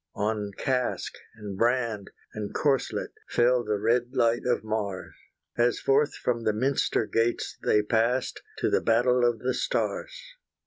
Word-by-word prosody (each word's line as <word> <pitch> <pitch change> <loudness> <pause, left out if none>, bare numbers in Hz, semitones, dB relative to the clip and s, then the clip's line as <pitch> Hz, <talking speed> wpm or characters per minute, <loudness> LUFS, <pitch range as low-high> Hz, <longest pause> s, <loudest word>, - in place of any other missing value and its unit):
On 105 -1 -1
casque, 125 -2 -1 0.2
and 105 -3 -7
brand, 115 -2 0 0.2
and 105 -1 -5
corselet 140 -4 0 0.2
Fell 120 +1 +3
the 105 -2 -1
red 120 +4 +1
light 115 +1 +2
of 120 -2 +1
Mars, 105 -3 -3 0.5
As 120 0 +3
forth 140 +1 +2
from 120 -2 -1
the 110 - +1
minster 130 0 +1
gates 115 +2 -1
they 105 - +3
passed 115 +4 0 0.2
To - - 0
the - - +3
battle 120 +2 +3
of 120 -1 +3
the 125 +3 -1
stars. - - -1
115 Hz, 145 wpm, -27 LUFS, 110-125 Hz, 0.5 s, Fell